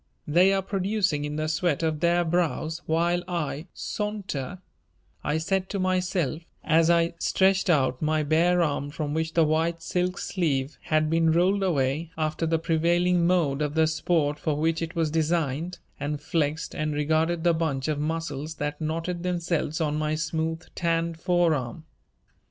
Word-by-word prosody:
"They 175 Hz, +6 st, +5 dB
are 195 Hz, -1 st, +1 dB
producing 190 Hz, -6 st, 0 dB
in 150 Hz, 0 st, -4 dB
the 155 Hz, 0 st, -1 dB
sweat 160 Hz, 0 st, 0 dB
of 160 Hz, -2 st, 0 dB
their 175 Hz, +1 st, +3 dB
brows 165 Hz, -1 st, -1 dB
while 170 Hz, +2 st, +1 dB
I 165 Hz, -2 st, -3 dB
saunter," 200 Hz, -9 st, -4 dB, 0.7 s
I 150 Hz, -, 0 dB
said 190 Hz, +4 st, -1 dB
to 200 Hz, -, -3 dB
myself, 185 Hz, -4 st, 0 dB, 0.2 s
as 165 Hz, 0 st, +3 dB
I 170 Hz, 0 st, +3 dB
stretched 190 Hz, 0 st, +2 dB
out 130 Hz, -6 st, +2 dB
my 155 Hz, 0 st, +1 dB
bare 170 Hz, +4 st, +3 dB
arm 145 Hz, -2 st, -1 dB
from 145 Hz, 0 st, -4 dB
which 160 Hz, +1 st, -2 dB
the 165 Hz, -, +5 dB
white 165 Hz, +2 st, 0 dB
silk 180 Hz, +2 st, -1 dB
sleeve 145 Hz, -6 st, -1 dB
had 155 Hz, 0 st, +2 dB
been 165 Hz, 0 st, +3 dB
rolled 185 Hz, +5 st, +3 dB
away 155 Hz, -3 st, 0 dB
after 155 Hz, +1 st, -1 dB
the 165 Hz, 0 st, +2 dB
prevailing 170 Hz, +2 st, +2 dB
mode 155 Hz, -6 st, +2 dB
of 150 Hz, 0 st, -1 dB
the 160 Hz, 0 st, +4 dB
sport 155 Hz, -2 st, 0 dB
for 155 Hz, -, -1 dB
which 165 Hz, +2 st, 0 dB
it 165 Hz, 0 st, -4 dB
was 165 Hz, -2 st, 0 dB
designed, 160 Hz, 0 st, 0 dB, 0.2 s
and 145 Hz, +1 st, -2 dB
flexed 155 Hz, -2 st, -1 dB
and 155 Hz, -1 st, -2 dB
regarded 160 Hz, +3 st, +1 dB
the 170 Hz, -1 st, +4 dB
bunch 155 Hz, -5 st, -1 dB
of 150 Hz, -2 st, -1 dB
muscles 155 Hz, -1 st, -3 dB
that 150 Hz, 0 st, -4 dB
knotted 165 Hz, +3 st, -2 dB
themselves 170 Hz, -3 st, -1 dB
on 150 Hz, -2 st, 0 dB
my 155 Hz, 0 st, 0 dB
smooth, 160 Hz, +1 st, -2 dB
tanned 165 Hz, -1 st, -1 dB
forearm. 165 Hz, -6 st, 0 dB
160 Hz, 165 wpm, -26 LUFS, 155-175 Hz, 0.7 s, They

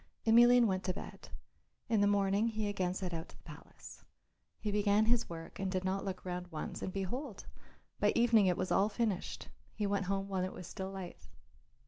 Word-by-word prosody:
Emelian 240 Hz, +2 st, +7 dB
went 190 Hz, -3 st, 0 dB
to 185 Hz, -, -1 dB
bed. -, -, -9 dB, 0.6 s
In 225 Hz, -3 st, +2 dB
the 205 Hz, -, +5 dB
morning 200 Hz, +1 st, +2 dB
he 215 Hz, -2 st, -1 dB
again 185 Hz, -3 st, -1 dB
set 185 Hz, -3 st, -4 dB
out 165 Hz, -1 st, -5 dB
to -, -, -15 dB
the -, -, -22 dB
palace. -, -, -12 dB, 0.6 s
He 210 Hz, -, -2 dB
began 205 Hz, +1 st, +3 dB
his 235 Hz, +1 st, +2 dB
work 165 Hz, -1 st, -8 dB
and 195 Hz, -1 st, -1 dB
did 185 Hz, -1 st, -1 dB
not 190 Hz, +1 st, -1 dB
look 185 Hz, -2 st, -5 dB
round 180 Hz, 0 st, -4 dB
once, 160 Hz, -3 st, -6 dB
and 185 Hz, -, -3 dB
behold! 210 Hz, +5 st, -4 dB, 0.5 s
by -, -, +4 dB
evening 230 Hz, -4 st, +5 dB
it 180 Hz, -, +2 dB
was 185 Hz, -, -2 dB
all 200 Hz, +2 st, +4 dB
finished; 215 Hz, -5 st, -2 dB, 0.3 s
he 210 Hz, -, -1 dB
went 200 Hz, -1 st, 0 dB
home 195 Hz, 0 st, -1 dB
when 190 Hz, -2 st, -1 dB
it 185 Hz, -, -3 dB
was 180 Hz, -, -8 dB
still 190 Hz, +2 st, -5 dB
light. 190 Hz, -2 st, -8 dB
195 Hz, 200 wpm, -34 LUFS, 185-215 Hz, 0.6 s, Emelian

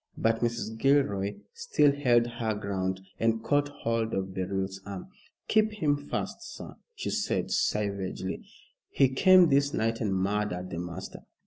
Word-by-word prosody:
But 115 Hz, 0 st, +2 dB
Mrs. 115 Hz, -2 st, -2 dB
Gilroy 110 Hz, -8 st, +2 dB, 0.2 s
still 465 Hz, -, +3 dB
held 125 Hz, -5 st, +3 dB
her 115 Hz, -2 st, -2 dB
ground 95 Hz, -2 st, -2 dB, 0.2 s
and 115 Hz, 0 st, +1 dB
caught 145 Hz, 0 st, +2 dB
hold 115 Hz, -5 st, -2 dB
of 95 Hz, 0 st, -3 dB
Beryl's 95 Hz, +1 st, -3 dB
arm. 100 Hz, -, -7 dB, 0.4 s
"Keep 215 Hz, 0 st, +3 dB
him 155 Hz, -8 st, +1 dB
fast, 145 Hz, 0 st, -4 dB, 0.2 s
sir," -, -, -9 dB, 0.2 s
she -, -, -3 dB
said -, -, -1 dB
savagely. 100 Hz, -2 st, -1 dB, 0.5 s
"He 135 Hz, -2 st, +3 dB
came 185 Hz, +5 st, +6 dB
this 140 Hz, 0 st, +2 dB
night 115 Hz, +1 st, 0 dB
and 100 Hz, -4 st, 0 dB
murdered 95 Hz, -1 st, -1 dB
the 85 Hz, -, -4 dB
master." 85 Hz, -1 st, -6 dB
110 Hz, 145 wpm, -28 LUFS, 95-140 Hz, 0.5 s, came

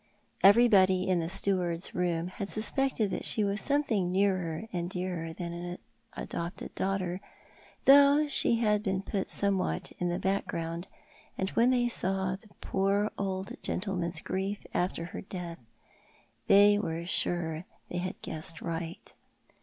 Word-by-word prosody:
Every 230 Hz, +5 st, +7 dB
body 190 Hz, -4 st, +4 dB
in 185 Hz, -2 st, +2 dB
the 165 Hz, 0 st, -2 dB
steward's 180 Hz, -2 st, -1 dB
room 175 Hz, -1 st, 0 dB
had 195 Hz, +2 st, -5 dB
suspected 220 Hz, -1 st, 0 dB
that -, -, -3 dB
she 215 Hz, -, +2 dB
was 200 Hz, +1 st, 0 dB
something 245 Hz, -11 st, +1 dB
nearer 185 Hz, -1 st, 0 dB
and 175 Hz, -1 st, -2 dB
dearer 180 Hz, -3 st, -3 dB
than 170 Hz, +1 st, -5 dB
an 175 Hz, +1 st, -5 dB, 0.4 s
adopted 170 Hz, +2 st, -5 dB
daughter, 190 Hz, -1 st, -1 dB, 0.6 s
though 285 Hz, +2 st, +7 dB
she 270 Hz, -4 st, +2 dB
had 210 Hz, -3 st, +2 dB
been 190 Hz, -2 st, -1 dB
put 195 Hz, -1 st, -2 dB
somewhat 195 Hz, -2 st, 0 dB
in 180 Hz, -, 0 dB
the 175 Hz, -, -1 dB
background; 175 Hz, -3 st, -2 dB, 0.5 s
and 190 Hz, +1 st, -1 dB
when 235 Hz, +2 st, +4 dB
they 245 Hz, -1 st, +3 dB
saw 190 Hz, -4 st, 0 dB
the 200 Hz, +3 st, -16 dB
poor 200 Hz, +2 st, +1 dB
old 190 Hz, -1 st, -3 dB
gentleman's 180 Hz, -4 st, -2 dB
grief 195 Hz, +2 st, -3 dB
after 175 Hz, -2 st, -1 dB
her 175 Hz, -, -7 dB
death 180 Hz, -3 st, -7 dB, 0.9 s
they 205 Hz, +1 st, +7 dB
were 165 Hz, -4 st, -3 dB
sure 170 Hz, -2 st, -1 dB, 0.2 s
they 175 Hz, -, -2 dB
bad 185 Hz, +1 st, -5 dB
guessed 160 Hz, +1 st, -5 dB
right. 165 Hz, 0 st, -5 dB
190 Hz, 145 wpm, -30 LUFS, 175-205 Hz, 0.9 s, Every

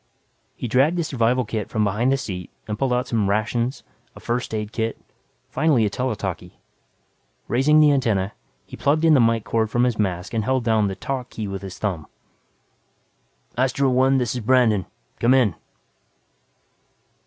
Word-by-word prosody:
He -, -, -5 dB
dragged 135 Hz, +9 st, +2 dB
the 170 Hz, -, +1 dB
survival 125 Hz, -3 st, +1 dB
kit 105 Hz, -1 st, -4 dB
from 110 Hz, -2 st, 0 dB
behind 105 Hz, +6 st, +1 dB
the 135 Hz, -, +2 dB
seat 90 Hz, -8 st, -6 dB, 0.2 s
and 105 Hz, 0 st, -4 dB
pulled 135 Hz, -2 st, 0 dB
out 125 Hz, +1 st, 0 dB
some 110 Hz, -5 st, 0 dB
rations, 115 Hz, +5 st, -1 dB, 0.3 s
a -, -, -11 dB
first 120 Hz, +1 st, -3 dB
aid 105 Hz, -1 st, -3 dB
kit, 110 Hz, 0 st, -2 dB, 0.5 s
finally 140 Hz, -5 st, +2 dB
a 105 Hz, -, -1 dB
tele 125 Hz, 0 st, -2 dB
talkie. 95 Hz, -4 st, -6 dB, 0.9 s
Raising 145 Hz, +5 st, +3 dB
the 150 Hz, -1 st, +6 dB
antenna, 110 Hz, -8 st, 0 dB, 0.3 s
he -, -, -10 dB
plugged 150 Hz, +4 st, +1 dB
in 160 Hz, -, +6 dB
the 140 Hz, -, +5 dB
mike 115 Hz, -2 st, +3 dB
cord 110 Hz, -1 st, 0 dB
from 120 Hz, +2 st, +1 dB
his 125 Hz, -3 st, 0 dB
mask 90 Hz, -2 st, -2 dB
and 110 Hz, -1 st, 0 dB
held 130 Hz, +2 st, 0 dB
down 110 Hz, -2 st, +2 dB
the 95 Hz, -, -3 dB
"talk" 130 Hz, +1 st, -4 dB
key 110 Hz, -2 st, -5 dB
with 95 Hz, -1 st, -5 dB
his 95 Hz, -2 st, -8 dB
thumb. 90 Hz, -7 st, -3 dB, 1.5 s
"Astro 130 Hz, +2 st, +1 dB
One, 130 Hz, +2 st, +3 dB
this 120 Hz, -4 st, 0 dB
is 125 Hz, -, -4 dB
Brandon. 110 Hz, -4 st, +3 dB, 0.3 s
Come 120 Hz, +3 st, +4 dB
in." 120 Hz, -8 st, +3 dB
120 Hz, 175 wpm, -22 LUFS, 105-130 Hz, 1.5 s, the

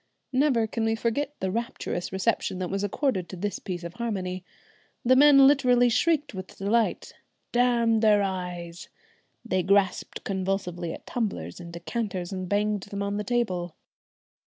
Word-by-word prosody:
Never 260 Hz, -4 st, +3 dB
can 225 Hz, +1 st, -3 dB
we 225 Hz, 0 st, +1 dB
forget 240 Hz, +6 st, -1 dB
the 190 Hz, 0 st, -1 dB
rapturous 230 Hz, -5 st, -3 dB
reception 190 Hz, 0 st, 0 dB
that 185 Hz, -1 st, -3 dB
was 195 Hz, +1 st, -1 dB
accorded 205 Hz, -, -1 dB
to -, -, -7 dB
this 205 Hz, +3 st, -3 dB
piece 180 Hz, -2 st, -5 dB
of 170 Hz, 0 st, -6 dB
harmony. 185 Hz, -6 st, -3 dB, 0.6 s
The 255 Hz, +2 st, +6 dB
men 275 Hz, 0 st, +8 dB
literally 250 Hz, -3 st, +5 dB
shrieked 300 Hz, +4 st, +1 dB
with 190 Hz, -1 st, -8 dB
delight. 220 Hz, +4 st, 0 dB, 0.4 s
"Damn 240 Hz, -2 st, +3 dB
their 210 Hz, -2 st, +4 dB
eyes!" 180 Hz, -3 st, -5 dB, 0.6 s
they 185 Hz, -5 st, +1 dB
grasped 195 Hz, +1 st, +1 dB
convulsively 185 Hz, -3 st, -2 dB
at -, -, -9 dB
tumblers 140 Hz, -, -3 dB
and 170 Hz, -1 st, -9 dB
decanters 185 Hz, 0 st, -4 dB
and 185 Hz, -2 st, -4 dB
banged 210 Hz, 0 st, +1 dB
them 200 Hz, +1 st, -5 dB
on 200 Hz, 0 st, -2 dB
the 210 Hz, -, -2 dB
table. 185 Hz, -8 st, -1 dB
200 Hz, 155 wpm, -26 LUFS, 185-235 Hz, 0.6 s, men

